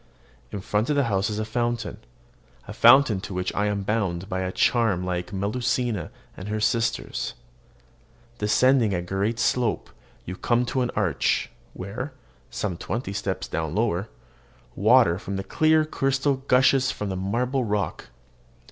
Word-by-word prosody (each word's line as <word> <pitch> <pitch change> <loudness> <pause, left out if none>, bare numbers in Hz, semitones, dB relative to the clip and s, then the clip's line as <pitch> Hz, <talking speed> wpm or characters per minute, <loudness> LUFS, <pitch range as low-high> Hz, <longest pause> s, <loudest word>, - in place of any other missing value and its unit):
In 100 - -5
front 105 +5 -1
of 150 - +2
the 140 - +3
house 100 -3 0
is 105 - -3
a 110 - -2
fountain, 120 0 -2 0.7
a - - -6
fountain 130 -8 +6
to 100 -1 -6
which 90 0 -2
I 105 0 0
am 100 -1 -1
bound 95 -4 -1
by 95 -2 -3
a 95 0 -2
charm 110 -4 +2
like 90 +1 -3
Melusina 110 +2 -1 0.3
and 90 - -8
her 105 +1 -2
sisters. 110 +2 -1 1.0
Descending 110 0 +3
a 90 - -2
gentle 100 +5 -1
slope, 120 -1 0 0.3
you 90 - -5
come 120 +1 +1
to 130 +2 -1
an 125 - 0
arch, 100 -6 0 0.2
where, 110 +10 -6 0.4
some 95 -5 -3
twenty 105 +2 -4
steps - - -3
lower 85 +4 0
down, 105 - -10 0.7
water 110 -3 +5
of 100 0 -5
the 95 - -3
clearest 155 - +2
crystal 135 +1 +1
gushes 130 +1 +4
from 105 -5 -3
the 95 - -3
marble 120 +8 -1
rock. 105 -2 -2
105 Hz, 155 wpm, -25 LUFS, 95-125 Hz, 1.0 s, fountain